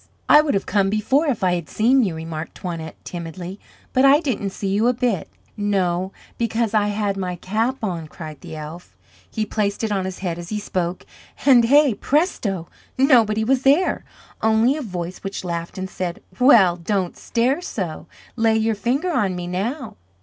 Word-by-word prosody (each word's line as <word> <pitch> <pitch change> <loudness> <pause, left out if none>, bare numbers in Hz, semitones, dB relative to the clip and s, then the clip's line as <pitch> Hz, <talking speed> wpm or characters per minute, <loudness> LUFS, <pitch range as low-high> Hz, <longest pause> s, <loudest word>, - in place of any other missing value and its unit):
"I 300 - +8
would 300 -7 0
have 195 - -1
come 195 -2 +2
before 260 +9 +1
if 235 -8 -1
I 180 -1 +3
had 170 -4 -3
seen 250 +5 +3
you," 185 -6 -1
remarked 160 0 -6
Toinette, 165 -3 -6
timidly. 175 +2 -7 0.3
"But 260 - +3
I 275 +2 +7
didn't 245 -10 -2
see 195 +1 -4
you 210 +4 +2
a 250 - +4
bit." 235 -8 -1 0.3
"No, 190 -3 0 0.3
because 230 -1 0
I 210 -1 +3
had 205 -1 -1
my 180 -2 -3
cap 220 +8 -2
on," 170 -6 -3
cried 155 -2 -9
the - - -8
elf. 155 - -9 0.3
He 220 - -2
placed 205 0 -1
it 220 - 0
on 195 -2 0
his 190 -1 -5
head 175 -3 -3
as 170 0 -8
he 215 - -2
spoke, 180 -3 -3 0.4
and 250 -4 +7
hey, 285 +1 +5
presto! 210 - 0 0.3
nobody 230 -6 +4
was 255 +3 +2
there, 285 +7 +3 0.4
only 220 +4 +3
a 310 - -4
voice 180 -6 -5
which 195 0 -5
laughed 170 0 -4
and 190 0 -3
said: 180 -2 -4 0.2
"Well 215 -9 +6
don't 185 +1 -1
stare 255 +7 0
so. 175 - -5 0.3
Lay 225 -1 +3
your 220 0 +1
finger 265 - -1
on 195 - +1
me 175 0 -4
now." 220 - -3
205 Hz, 185 wpm, -22 LUFS, 180-240 Hz, 0.4 s, I